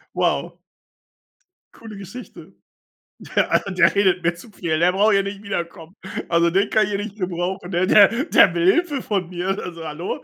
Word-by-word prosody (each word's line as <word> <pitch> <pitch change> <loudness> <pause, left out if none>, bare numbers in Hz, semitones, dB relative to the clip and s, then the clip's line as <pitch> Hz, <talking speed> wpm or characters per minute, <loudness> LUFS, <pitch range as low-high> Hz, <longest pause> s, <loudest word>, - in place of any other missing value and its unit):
Wow. - - -1 1.2
Coole 220 -2 -11
Geschichte. 200 +6 -11 0.8
Der - - +2
also, 195 - +1
der 185 - +3
redet 190 -3 +2
mir 170 +1 +1
zu 175 +6 -15
viel, 165 -5 -2
der 175 +2 +3
braucht 205 +3 +3
hier 195 - +3
nicht 200 +1 -7
wiederkommen. 170 -3 -6 0.3
Also, 170 0 +3
den 195 +4 +1
kann 215 - +3
ich - - -6
hier 200 - -1
nicht 215 -2 -8
gebrauchen, 180 -1 -4
der 175 +2 +1
der 220 +7 +5
der 190 - +5
will 170 0 0
Hilfe 320 -6 -1
von 190 -5 -2
mir. 180 0 -5
Also, 165 -2 -8
hallo? 155 +4 -5
185 Hz, 180 wpm, -21 LUFS, 170-205 Hz, 1.2 s, der